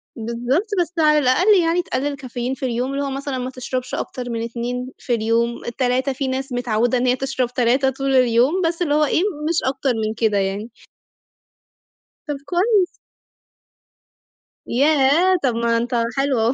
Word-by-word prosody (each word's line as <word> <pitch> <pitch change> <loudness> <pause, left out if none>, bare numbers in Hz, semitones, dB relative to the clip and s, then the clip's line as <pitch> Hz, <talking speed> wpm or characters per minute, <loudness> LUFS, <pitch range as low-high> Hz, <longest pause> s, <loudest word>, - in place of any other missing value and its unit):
بالضبط 240 - -1
بس 345 0 -3
على 305 -1 +5
الأقل 350 +10 +4
يعني 335 +2 +2
تقَلِّل 285 -3 -2
كافيين 255 -2 -4
في 265 - -5
اليوم، 250 +2 -2
اللي 280 +1 -1
هو 280 - -2
مثلًا 275 0 -4
ما 255 0 -3
تشربش 255 0 -5
أكتر 245 -1 -5
من 230 -1 -3
2 245 +2 -4
في 245 - -3
اليوم، 230 +1 0 0.2
3، 260 +1 +1
في 270 +1 -3
ناس 265 +1 -3
متعودة 245 0 +1
إن 245 - 0
هي 250 - +3
تشرب 255 -2 -2
3 255 +2 +2
طول 270 +1 -1
اليوم، 255 +7 +3
بس 335 +1 -1
اللي 305 -4 +1
هو 300 +1 +3
إيه، 310 - +1 0.3
مش 335 - 0
أكتر 265 0 0
من 215 - -2
كده 220 -2 +1
يعني. 200 +3 -2 1.6
طب 295 -1 -2
كويس. 370 +2 +2 1.8
ياه! 295 +7 +3
طب 250 -4 +1
ما 230 0 +1
أنت 240 +1 -2 0.2
حلو 270 -2 +1
أهو، 225 +3 +2
260 Hz, 165 wpm, -21 LUFS, 240-285 Hz, 1.8 s, على